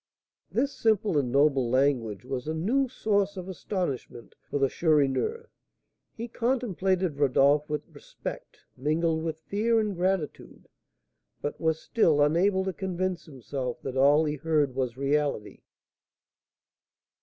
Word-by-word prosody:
This 275 +4 0
simple 215 -4 +1
and 125 -3 -2
noble 140 -3 +3
language 125 -5 +1
was 130 0 -4
a 160 - -1
new 245 +12 +1
source 200 -4 0
of 180 0 -6
astonishment 180 - -4 0.2
for - - -1
the 135 -1 +3
Chourineur; 160 - +1 0.7
he 230 +1 -4
contemplated 195 - 0
Rodolph 145 +2 +3
with 150 0 -2
respect, - - -9
mingled 160 +4 0
with 160 -1 -4
fear 225 +6 +1
and 210 -3 -1
gratitude, 180 -3 -2 0.7
but 145 - -5
was 160 -1 +2
still 165 -10 +2
unable 185 +6 +3
to 190 - -2
convince 185 -1 -3
himself 130 -3 -5
that 135 -1 -4
all 145 +4 +5
he 150 0 -2
heard 150 -3 +1
was 130 -2 -2
reality. 140 -5 -1
160 Hz, 130 wpm, -27 LUFS, 140-190 Hz, 0.7 s, all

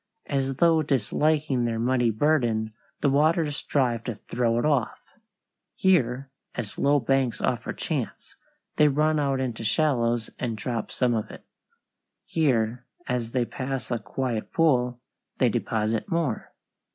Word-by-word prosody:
As 135 -1 -1
though 165 +1 +4
disliking 145 0 +1
their 115 -1 -1
muddy 120 +1 +2
burden, 115 -3 +1 0.3
the 140 - +3
waters 150 +1 +2
strive 125 -6 0
to 120 - -3
throw 115 +2 -1
it 120 - +1
off. 140 -6 -1 0.6
Here, 135 -8 +2 0.2
as 105 - -5
low 145 +1 +4
banks 130 -1 +1
offer - - -1
chance, - - -4 0.4
they 150 - +6
run 150 +2 +2
out 140 -2 +1
into 120 -4 -3
shallows 115 -1 +1
and 115 -3 -2
drop 115 0 -3
some 125 -2 +1
of 110 -2 -2
it. - - -12 0.8
Here, 125 -5 0 0.2
as 120 -2 -2
they 125 -2 +2
pass 130 +1 -4
a 120 - 0
quiet 110 +2 -3
pool, 125 -7 +2 0.4
they - - +3
deposit 110 - -1
more. 165 - -1
125 Hz, 140 wpm, -26 LUFS, 115-145 Hz, 0.8 s, they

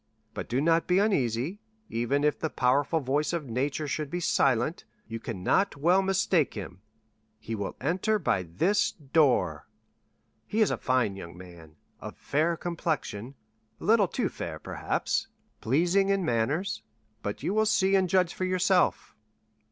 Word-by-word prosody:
But - - -6
do 125 - +1
not 165 +1 +2
be 180 - +3
uneasy; 160 - +1 0.3
even 120 +5 0
if 150 - +1
the 160 - -1
powerful 140 +5 +1
voice 145 +5 0
of 165 -4 -2
nature 135 +5 -2
should 150 0 -3
be 175 - -3
silent, 135 -2 +1 0.2
you 115 0 -5
cannot 115 - 0
well 175 +6 +4
mistake 190 -5 +1
him; 95 -3 -7 0.6
he 110 +1 -7
will 100 -3 -4
enter 180 +9 +1
by 150 - 0
this 95 - +1
door. 145 -2 +1 0.8
He 215 - -2
is 215 - +4
a - - -1
fine 125 -6 +1
young 85 -2 -9
man, 85 -4 -13 0.2
of - - -9
fair 160 +4 0
complexion—a 110 -10 -5
little 215 -2 +4
too - - -1
fair, - - -6
perhaps—pleasing 175 - -1
in 195 -2 +1
manners; 140 - 0 0.4
but 105 - -5
you 190 - 0
will 215 0 +2
see 195 -2 +2
and 190 -2 +3
judge 180 -1 +2
for 185 - -2
yourself." 185 0 +1
150 Hz, 150 wpm, -28 LUFS, 115-185 Hz, 0.8 s, well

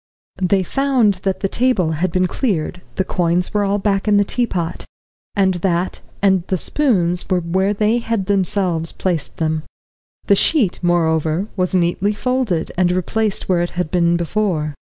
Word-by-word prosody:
They 190 +1 +2
found 245 -4 +1
that 190 -1 -2
the 195 - +1
table 215 -7 +1
had 165 +3 -1
been 185 +1 +2
cleared, 180 - -2
the 190 - +1
coins 175 0 0
were 210 -1 +2
all 200 0 +1
back 200 0 0
in 210 -1 +4
the 205 - +4
teapot, 190 -7 -2 0.5
and 190 -2 +3
that 180 0 -1 0.2
and 190 -2 +4
the 185 - 0
spoons 180 - 0
were 185 -2 +2
where 190 +4 0
they 215 +3 +1
had 230 -4 -2
themselves 185 -4 0
placed 165 -7 -3
them. 160 -2 0 0.6
The 200 - +4
sheet, 215 - +2
moreover, 165 +1 +1
was 185 -1 0
neatly 180 +3 +1
folded, 245 -8 -1
and 180 -1 +3
replaced 200 +4 -1
where 180 -2 +2
it 175 - -1
had 180 -3 -1
been 170 -1 +2
before. 170 -4 -1
185 Hz, 165 wpm, -19 LUFS, 175-205 Hz, 0.6 s, in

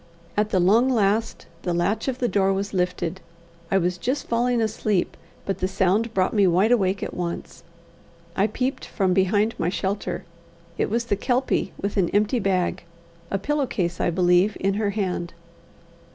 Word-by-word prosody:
At 210 +1 +1
the 190 - +2
long 220 +8 +4
last 225 -1 +1 0.2
the 175 -1 -1
latch 205 +7 0
of 260 -2 -1
the 250 - 0
door 195 -3 +2
was 200 +1 -3
lifted. 180 -1 -1 0.5
I 195 - +3
was 180 -1 0
just 260 +4 -2
falling 240 +1 +1
asleep, 215 -3 0 0.3
but 195 -1 -2
the 185 - 0
sound 195 +4 +1
brought 190 -3 +1
me 205 -3 +4
wide 185 +6 +3
awake 195 -4 +2
at - - -4
once. 175 -1 -5 0.7
I 200 - +3
peeped 255 +5 -2
from 190 -3 0
behind 205 +4 +2
my 175 - +1
shelter. 190 -1 -3 0.5
It - - -1
was 235 +2 0
the 205 - +1
Kelpie, 250 0 0
with 200 +1 -3
an 185 -3 +2
empty 210 +4 +2
bag 185 -3 0 0.5
a 195 - 0
pillow 285 +6 -1
case, 175 -7 -2
I - - +2
believe 180 +3 +3
in 195 0 +1
her 205 0 0
hand. 185 -4 -3
195 Hz, 175 wpm, -24 LUFS, 185-225 Hz, 0.7 s, long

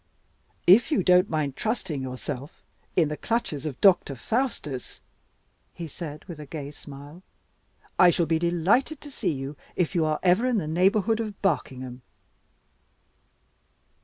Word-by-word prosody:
"If 210 - +6
you 275 -11 +2
don't 180 +2 +5
mind 150 -4 -1
trusting 215 - -2
yourself 130 +2 -6 0.3
in 165 -4 +4
the 150 - -2
clutches 185 - -2
of 135 -4 -6
Doctor 180 -8 +5
Faustus," 150 - -3 0.8
he 170 - -6
said, 155 -1 -8
with 170 -5 -9
a 150 - -8
gay 145 -1 -6
smile, 145 +3 -12 0.8
"I 180 - +8
shall 170 0 +2
be 160 0 +1
delighted 180 - +2
to 290 - -10
see - - -1
you 135 0 -5 0.2
if 180 0 0
you 170 -3 +2
are 155 -1 0
ever 185 +7 +4
in 250 -3 +2
the 180 - -1
neighborhood 195 +7 +2
of 215 -3 -4
Barkingham." 130 -8 -1
170 Hz, 145 wpm, -26 LUFS, 145-195 Hz, 0.8 s, I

